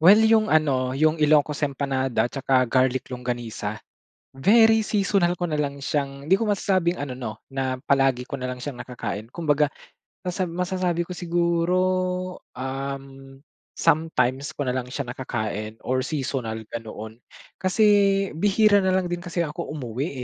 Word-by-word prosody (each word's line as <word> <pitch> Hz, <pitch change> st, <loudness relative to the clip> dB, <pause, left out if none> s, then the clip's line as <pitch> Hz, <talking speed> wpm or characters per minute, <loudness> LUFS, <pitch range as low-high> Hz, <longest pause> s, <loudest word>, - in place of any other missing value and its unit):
well 185 Hz, +6 st, +8 dB
'yung 220 Hz, 0 st, +4 dB
ano 135 Hz, -6 st, +2 dB
'yung 155 Hz, +2 st, +2 dB
Ilocos 150 Hz, -1 st, +3 dB
Empanada 135 Hz, -3 st, 0 dB
at 120 Hz, -, -4 dB
saka 130 Hz, -2 st, +2 dB
garlic 130 Hz, +1 st, +1 dB
longganisa, 120 Hz, -2 st, -4 dB, 0.6 s
very 220 Hz, -, +5 dB
seasonal 195 Hz, -4 st, +1 dB
ko 175 Hz, -, -1 dB
nalang 150 Hz, -3 st, -2 dB
siyang 140 Hz, 0 st, -3 dB
hindi 170 Hz, -, +3 dB
ko 215 Hz, +2 st, +2 dB
masasabing 185 Hz, -3 st, +1 dB
ano 140 Hz, -2 st, -4 dB
'no, 120 Hz, -4 st, -6 dB, 0.2 s
na 130 Hz, -1 st, -1 dB
palagi 135 Hz, -3 st, +2 dB
ko -, -, -11 dB
nalang 125 Hz, -2 st, -3 dB
siyang 125 Hz, 0 st, -6 dB
nakakain 115 Hz, -3 st, -5 dB
kumbaga 150 Hz, -1 st, +1 dB, 0.6 s
masab 180 Hz, 0 st, -1 dB
masasabi 180 Hz, 0 st, -1 dB
ko 180 Hz, -, -8 dB
siguro, 170 Hz, 0 st, 0 dB, 0.8 s
uhm, 135 Hz, +1 st, -6 dB, 0.3 s
sometimes 140 Hz, -4 st, +1 dB
ko 145 Hz, -, -2 dB
nalang 125 Hz, -1 st, -2 dB
siya 140 Hz, +2 st, -4 dB
nakakain 110 Hz, -4 st, -4 dB
or 130 Hz, 0 st, +1 dB
seasonal 130 Hz, -5 st, -3 dB, 0.2 s
ganoon. 110 Hz, 0 st, -7 dB, 0.4 s
Kasi 190 Hz, +4 st, +2 dB, 0.6 s
bihira 205 Hz, +1 st, +5 dB
nalang 190 Hz, -1 st, +2 dB
din 175 Hz, 0 st, -3 dB
kasi 175 Hz, -1 st, -2 dB
ako 165 Hz, +2 st, -5 dB
umuwi, 135 Hz, -1 st, -3 dB
140 Hz, 140 wpm, -24 LUFS, 130-175 Hz, 0.8 s, well